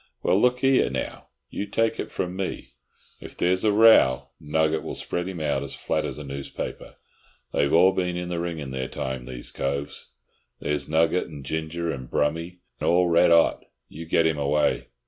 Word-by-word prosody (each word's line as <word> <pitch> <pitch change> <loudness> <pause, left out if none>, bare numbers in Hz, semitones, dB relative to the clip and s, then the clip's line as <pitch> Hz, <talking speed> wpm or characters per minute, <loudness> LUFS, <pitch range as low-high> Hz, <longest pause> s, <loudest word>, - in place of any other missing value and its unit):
"Well, 95 - +3
look 125 +1 +2
'ere, 135 -1 +4
now, - - -5 0.2
you 105 - -4
take 115 +2 0
it - - -3
from 90 0 -3
me, 95 -1 -5 0.5
if - - -11
there's 90 +1 +2
a 110 - +4
row 105 - +5
Nugget 80 +1 0
will - - -6
spread 90 +1 -3
him 95 -3 -5
out 75 -3 0
as 70 - -5
flat 80 -1 -1
as 70 -3 -4
a 75 - -7
newspaper. 70 0 -6 0.6
They've 70 - +2
all 90 +3 +6
been 90 -2 -1
in 90 0 -4
the 85 -1 -2
ring 85 -1 -3
in 70 -3 -6
their 65 -1 -3
time, 65 -1 -5
these 60 -1 -8
coves. 70 +1 -4 0.4
There's 75 -1 -2
Nugget, 80 +3 +2
and 75 -5 -10
Ginger, 80 +3 -3
and 65 -4 -7
Brummy—all 85 +3 0
red 85 - +5
'ot. 85 -1 +4 0.3
You 80 +2 -9
get 85 0 +3
him 80 -2 +1
away!" 75 +1 +1
80 Hz, 185 wpm, -25 LUFS, 70-90 Hz, 0.6 s, all